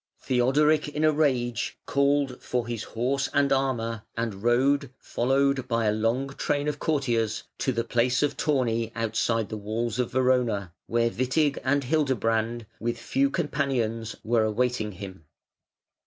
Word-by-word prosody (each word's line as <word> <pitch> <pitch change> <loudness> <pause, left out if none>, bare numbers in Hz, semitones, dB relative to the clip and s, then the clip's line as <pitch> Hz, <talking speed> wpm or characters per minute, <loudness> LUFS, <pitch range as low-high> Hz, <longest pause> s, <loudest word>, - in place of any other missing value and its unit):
Theodoric 145 +5 +2
in 150 +1 -3
a 155 - +5
rage 130 -6 0
called 140 -2 +1
for 125 -2 -2
his 120 -2 -4
horse 130 +6 -1
and 140 -1 +3
armour 115 -5 -1 0.2
and 115 -4 -3
rode, 135 +4 +2
followed 135 +1 +1
by 115 -2 0
a 105 - +3
long 115 +5 0
train 145 +1 -1
of 150 -1 -2
courtiers, 120 -8 0 0.2
to 130 - +1
the 115 -2 -1
place 120 +3 +1
of 145 - 0
tourney 115 -6 0
outside 115 -1 0
the 110 - -4
walls 110 +3 -3
of 125 - 0
Verona, 120 -8 +1
where 115 0 +1
Witig 135 +3 +1
and 140 +1 +2
Hildebrand, 120 -5 0
with 120 +1 -2
few 135 +4 +1
companions, 135 -8 -1
were 115 0 +2
awaiting 110 -1 0
him. 95 -3 -9
125 Hz, 145 wpm, -26 LUFS, 115-140 Hz, 0.2 s, a